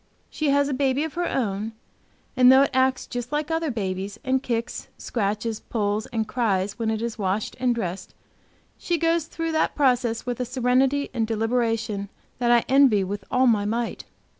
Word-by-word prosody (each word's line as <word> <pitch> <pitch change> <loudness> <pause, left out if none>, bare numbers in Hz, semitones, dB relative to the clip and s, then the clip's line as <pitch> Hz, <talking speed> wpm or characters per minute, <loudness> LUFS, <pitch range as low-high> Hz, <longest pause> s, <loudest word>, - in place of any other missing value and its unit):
She 305 -2 -1
has 280 0 +3
a 285 - -1
baby 270 +1 +1
of 320 - -4
her 350 0 -1
own, 215 -3 -2 0.6
and 255 0 +7
though 265 +1 +7
it - - 0
acts 260 0 +2
just 245 0 -5
like 300 +1 -1
other 325 -1 0
babies 195 -2 -3
and 260 0 +1
kicks, 235 -3 -3
scratches, 215 0 -2
pulls 210 -1 -2
and 220 -2 -2
cries 205 -4 -1
when 225 -1 0
it 220 0 -1
is 230 -2 -4
washed 200 +2 -1
and 250 -1 +2
dressed, 190 -5 -5 0.6
she 345 - 0
goes 330 0 +1
through 330 0 -4
that 315 - +1
process 245 -5 +1
with 245 -1 -3
a - - 0
serenity 260 +3 +1
and 225 -3 0
deliberation 225 -2 -1 0.3
that 240 -1 +1
I 240 -1 +4
envy 260 -7 +5
with 195 +1 -4
all 255 +1 +3
my 215 -4 +3
might. 230 +2 -2
240 Hz, 185 wpm, -24 LUFS, 215-265 Hz, 0.6 s, and